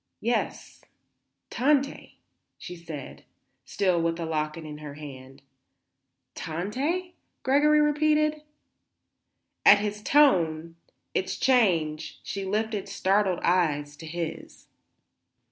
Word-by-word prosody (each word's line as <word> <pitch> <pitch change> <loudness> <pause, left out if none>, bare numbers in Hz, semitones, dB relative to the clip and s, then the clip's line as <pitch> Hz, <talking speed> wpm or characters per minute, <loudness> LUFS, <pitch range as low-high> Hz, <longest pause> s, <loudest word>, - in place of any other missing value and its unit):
"Yes; 235 +2 -2 0.7
Tante," 280 +1 0 0.4
she 180 - -8
said, 165 -5 -9 0.4
still 185 -1 +1
with 165 0 0
the 165 -1 -4
locket 155 0 -3
in 150 -1 -8
her 150 -2 -8
hand. 135 -2 -11 0.9
"Tante?" 265 - -3 0.3
Gregory 295 +3 +4
repeated. 305 0 +2 1.2
At 205 - +9
his 210 0 -3
tone, 170 - +3 0.4
its - - -1
change, 165 -12 +1
she 195 -1 -4
lifted 215 +1 -2
startled 190 -2 +1
eyes 150 -5 +1
to 160 - -9
his. 165 0 -6
180 Hz, 95 wpm, -27 LUFS, 155-260 Hz, 1.2 s, At